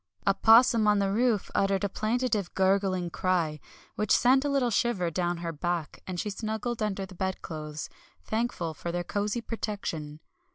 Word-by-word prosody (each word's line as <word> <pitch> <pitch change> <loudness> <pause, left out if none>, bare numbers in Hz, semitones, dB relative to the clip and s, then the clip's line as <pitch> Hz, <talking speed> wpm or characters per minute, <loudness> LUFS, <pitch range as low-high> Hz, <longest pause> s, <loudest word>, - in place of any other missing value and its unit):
A - - +4
'possum 230 -1 +6
on 210 0 +5
the 195 -1 +1
roof 225 -1 +1
uttered 195 0 +1
a - - +2
plaintive 215 -1 -1
gurgling 190 -2 +1
cry, 165 -3 0 0.3
which 210 -1 -2
sent 260 +2 +5
a 290 - 0
little 270 -4 +1
shiver 195 -6 +1
down 175 +1 -1
her 165 - -1
back, 170 0 -3
and 180 -2 -4
she 210 - -2
snuggled 220 +3 -3
under 195 -2 -1
the 190 - -13
bedclothes, 155 -5 -4 0.4
thankful 220 -8 -2
for 170 +3 -5
their 175 0 -2
cosy 205 +5 -2
protection. 185 -10 -4
195 Hz, 165 wpm, -28 LUFS, 175-220 Hz, 0.4 s, possum